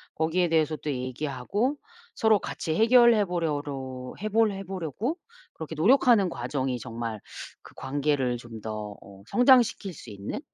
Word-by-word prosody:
거기에 165 +3 +1
대해서 160 -1 +2
또 150 - -4
얘기하고 135 - -2 0.4
서로 220 -3 +4
같이 160 - -4
해결해 230 +1 +5
보려로 145 -7 -4
해 215 - -3
볼 220 0 +3
해 195 0 -6
보려고 190 - -3 0.4
그렇게 160 0 -7
노력하는 225 - +4
과정이 130 0 -2
정말 115 -2 -5 0.4
그 - - -16
관계를 135 -2 -1
좀 115 -2 -10
더 105 -1 -5
어 100 -1 -15
성장시킬 245 - +4
수 - - -12
있는 100 -1 -6
155 Hz, 300 characters per minute, -27 LUFS, 125-205 Hz, 0.4 s, 해결해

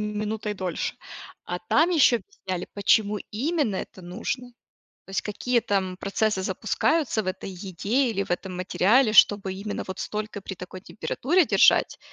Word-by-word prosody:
минутой 210 0 -3
дольше. 185 -3 -3 0.5
А 175 0 -4
там 310 - +2
еще 285 -7 +5
объясняли, 185 - -6
почему 205 +1 +2
именно 265 - 0
это 185 - -7
нужно. 240 +7 -5 0.5
То - - -13
есть 195 - -1
какие 235 +3 0
там 190 -4 -1
процессы 200 0 0
запускаются 220 - 0
в - - -10
этой 185 +1 -4
еде 200 +7 -1
или 200 -2 -1
в - - -17
этом 180 +1 -3
материале, 215 +6 +3
чтобы 200 -3 +5
именно 200 +2 -5
вот 190 0 -6
столько 210 -1 -4
при 190 - -7
такой 180 +1 -9
температуре 310 - 0
держать, - - +4
205 Hz, 155 wpm, -25 LUFS, 190-230 Hz, 0.5 s, еще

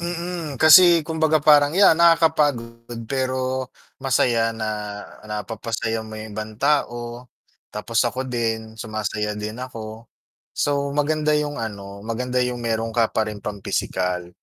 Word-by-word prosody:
Mm, 170 -4 -5
kasi 170 +1 +8
kumbaga 160 -1 +1
parang 145 0 +5
yan 190 -3 +5
nakakapagod 150 -9 +2 0.2
pero 130 -1 -1 0.3
masaya 120 -4 +1
na 110 -1 -4 0.6
napapasaya 110 +1 -4
mo 110 - -11
yung 110 -2 -9
ibang 110 0 -5
tao, 120 -4 -1 0.5
tapos 115 +3 0
ako 130 +2 -2
din 110 -2 -3
sumasaya 110 -1 -3
din 110 +2 -5
ako, 115 -3 -8 0.5
so 140 -1 -1
maganda 150 +1 +1
yung 150 -1 0
ano, 100 -3 -7
maganda 125 +2 -1
yung 125 -1 -3
meron 115 -1 -2
ka 115 -1 +2
pa 110 - 0
ring 105 -1 -7
pang 100 -1 -7
pisikal. 90 -1 -2
120 Hz, 135 wpm, -22 LUFS, 110-145 Hz, 0.6 s, kasi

